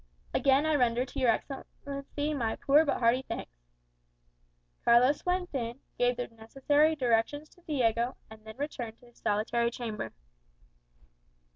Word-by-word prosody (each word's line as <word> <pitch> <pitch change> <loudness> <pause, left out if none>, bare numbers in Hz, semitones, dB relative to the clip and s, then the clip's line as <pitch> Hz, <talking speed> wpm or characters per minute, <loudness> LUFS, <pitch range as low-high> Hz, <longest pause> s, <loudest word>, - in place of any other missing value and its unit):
"Again 275 +2 +3
I 315 - +2
render 245 -3 +2
to 275 - -7
your 255 -2 +3
Excellency 280 +4 -3
my 235 -6 -1
poor 290 +3 +4
but 285 - +1
hearty 235 +2 +3
thanks." 255 - -6 1.3
Carlos 250 +5 +5
went 360 -1 0
in, 240 -1 -3 0.2
gave 245 0 +2
the 245 - -3
necessary 270 +7 +1
directions 260 +3 0
to 355 - -23
Diego, 245 -6 0
and 220 -1 -14
then 220 +1 -11
returned 245 -6 -5
to - - -18
his 240 -1 -21
solitary 235 +3 +1
chamber. 230 -3 -5
250 Hz, 140 wpm, -30 LUFS, 230-285 Hz, 1.3 s, Carlos